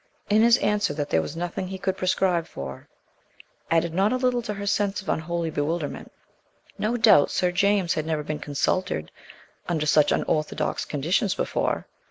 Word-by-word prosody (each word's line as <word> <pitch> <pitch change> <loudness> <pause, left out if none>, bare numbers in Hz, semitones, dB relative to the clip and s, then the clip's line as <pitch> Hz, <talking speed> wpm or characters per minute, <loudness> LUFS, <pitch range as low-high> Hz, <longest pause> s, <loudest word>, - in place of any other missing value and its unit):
And 215 +1 +5
his 235 +1 +6
answer 205 -8 0
that 145 -1 -3
there 80 - +3
was 145 - -6
"nothing 175 +2 -3
he 190 +1 -5
could 190 0 -1
prescribe 180 -2 +1
for" 70 0 -8 0.8
added 165 0 +1
not 195 +4 +2
a - - +1
little 250 -1 +1
to 215 -2 -4
her 200 0 -5
sense 205 0 0
of 190 - -8
unholy 170 0 -1
bewilderment. 150 +1 -3 0.7
No 230 +3 0
doubt 220 -10 +6
Sir 180 -1 +1
James 195 -1 +2
had 155 0 -3
never 155 -2 -1
been 150 0 -4
"consulted" 145 - -1 0.6
under 160 -3 0
such 150 0 +4
unorthodox 155 -1 -1
conditions 175 - 0
before. - - -1
175 Hz, 170 wpm, -25 LUFS, 155-200 Hz, 0.8 s, his